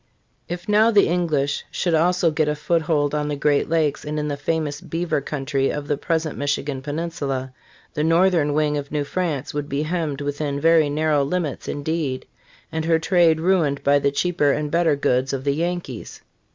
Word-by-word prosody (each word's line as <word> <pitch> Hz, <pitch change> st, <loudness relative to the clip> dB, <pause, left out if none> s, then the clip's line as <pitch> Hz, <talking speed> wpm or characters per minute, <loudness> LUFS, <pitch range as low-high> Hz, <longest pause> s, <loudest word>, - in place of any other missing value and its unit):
If 175 Hz, 0 st, -5 dB
now 210 Hz, +2 st, +5 dB
the 210 Hz, -3 st, +4 dB
English 155 Hz, -5 st, 0 dB
should 175 Hz, -, -1 dB
also 170 Hz, +1 st, +3 dB
get 155 Hz, 0 st, +1 dB
a 150 Hz, -, 0 dB
foot 165 Hz, +3 st, 0 dB
hold 150 Hz, -2 st, 0 dB
on 150 Hz, 0 st, -1 dB
the 150 Hz, -, -2 dB
Great 145 Hz, +1 st, +1 dB
Lakes 155 Hz, -3 st, +1 dB
and 150 Hz, 0 st, -4 dB
in 150 Hz, 0 st, -1 dB
the 145 Hz, -, -1 dB
famous 150 Hz, 0 st, -2 dB
beaver 165 Hz, -3 st, -2 dB
country 135 Hz, -1 st, -1 dB
of 145 Hz, -1 st, -4 dB
the 145 Hz, -, +1 dB
present 160 Hz, +1 st, -2 dB
Michigan 145 Hz, -1 st, -2 dB
peninsula, 140 Hz, -3 st, -3 dB, 0.4 s
the 150 Hz, -, -1 dB
northern 165 Hz, -2 st, +3 dB
wing 150 Hz, -1 st, +1 dB
of 140 Hz, 0 st, -8 dB
New 150 Hz, -1 st, 0 dB
France 150 Hz, -3 st, -3 dB
would 145 Hz, 0 st, -3 dB
be 140 Hz, +2 st, -1 dB
hemmed 155 Hz, -3 st, -2 dB
within 145 Hz, 0 st, -2 dB
very 160 Hz, -1 st, +4 dB
narrow 150 Hz, -1 st, +1 dB
limits 155 Hz, -2 st, -3 dB
indeed, 145 Hz, -3 st, -2 dB, 0.5 s
and 160 Hz, 0 st, -2 dB
her 165 Hz, 0 st, +3 dB
trade 165 Hz, -1 st, +3 dB
ruined 165 Hz, -5 st, +1 dB
by 145 Hz, 0 st, +4 dB
the 140 Hz, -, +2 dB
cheaper 150 Hz, 0 st, +1 dB
and 150 Hz, +1 st, -2 dB
better 165 Hz, -3 st, +3 dB
goods 135 Hz, -1 st, 0 dB
of 135 Hz, -1 st, -3 dB
the 140 Hz, 0 st, +1 dB
Yankees. 170 Hz, -6 st, -4 dB
150 Hz, 190 wpm, -22 LUFS, 145-165 Hz, 0.5 s, now